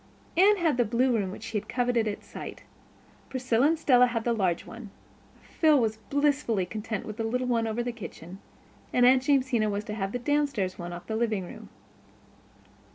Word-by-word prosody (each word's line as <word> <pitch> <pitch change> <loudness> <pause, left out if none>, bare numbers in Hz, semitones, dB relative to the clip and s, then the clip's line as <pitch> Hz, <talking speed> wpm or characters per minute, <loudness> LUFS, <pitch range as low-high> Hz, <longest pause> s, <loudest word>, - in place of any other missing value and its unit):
Anne 400 +4 +5
had 325 -8 +1
the 245 - +4
blue 240 +3 +1
room 195 -3 -2
she 220 -1 -3
had - - -16
coveted 245 -3 +1
at 205 - -4
sight. - - -9 0.7
Priscilla 255 0 +2
and 325 +1 +2
Stella 250 -5 +5
had 230 -2 -2
the 235 - +1
large 185 -6 0
one. 225 -2 -10 0.5
Phil 310 -3 +3
was 220 -2 0
blissfully 280 -5 0
content 215 +1 -5
with 215 0 -7
the 225 - -2
little 250 +3 -1
one 230 -2 +1
over 225 +2 -2
the 245 - -2
kitchen; 190 -5 -10 0.5
and 245 - +4
Aunt 255 +1 +6
Jamesina 260 -6 +2
was 205 0 -2
to 210 - -6
have 195 -2 -3
the 245 - -2
downstairs 270 -8 -1
one 175 0 -5
off 175 0 -8
the 220 - -3
living 220 -4 0
room. - - -11
235 Hz, 190 wpm, -27 LUFS, 215-255 Hz, 0.7 s, Aunt